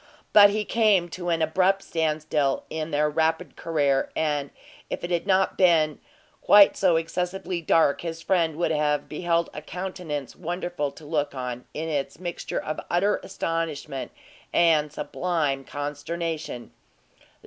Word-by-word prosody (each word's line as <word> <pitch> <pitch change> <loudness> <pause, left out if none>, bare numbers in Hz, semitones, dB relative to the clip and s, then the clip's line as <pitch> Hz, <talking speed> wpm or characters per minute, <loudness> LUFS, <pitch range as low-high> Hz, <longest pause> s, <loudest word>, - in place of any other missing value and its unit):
But 205 -1 +9
he 210 +1 -1
came 205 -7 +3
to 175 +1 -5
an 165 -1 +1
abrupt 185 +5 +2
stand 155 -2 -1
still 145 -3 0
in 160 0 -3
their 150 0 +2
rapid 160 +1 0
career; 145 -5 +1
and 145 -3 0 0.4
if - - -4
it 175 - -4
had 175 +2 -1
not 190 0 +2
been 160 -5 +4 0.4
quite 205 -1 +7
so 180 -3 +3
excessively 180 +2 -2
dark, 160 -3 +3
his 165 -1 -5
friend 165 -3 +1
would 170 +2 0
have 150 -1 0
beheld 170 +1 0
a 150 - -6
countenance 175 -6 -5
wonderful 175 -4 -3
to 155 - -14
look 145 -2 -1
on, 125 -1 -5
in 160 +2 -3
its 145 -3 -2
mixture 175 -2 -4
of 155 - -4
utter 195 +4 +2
astonishment 160 -5 -4 0.4
and 155 -3 +3
sublime 150 -2 -1
consternation. 145 -1 -5
160 Hz, 145 wpm, -25 LUFS, 150-175 Hz, 0.4 s, But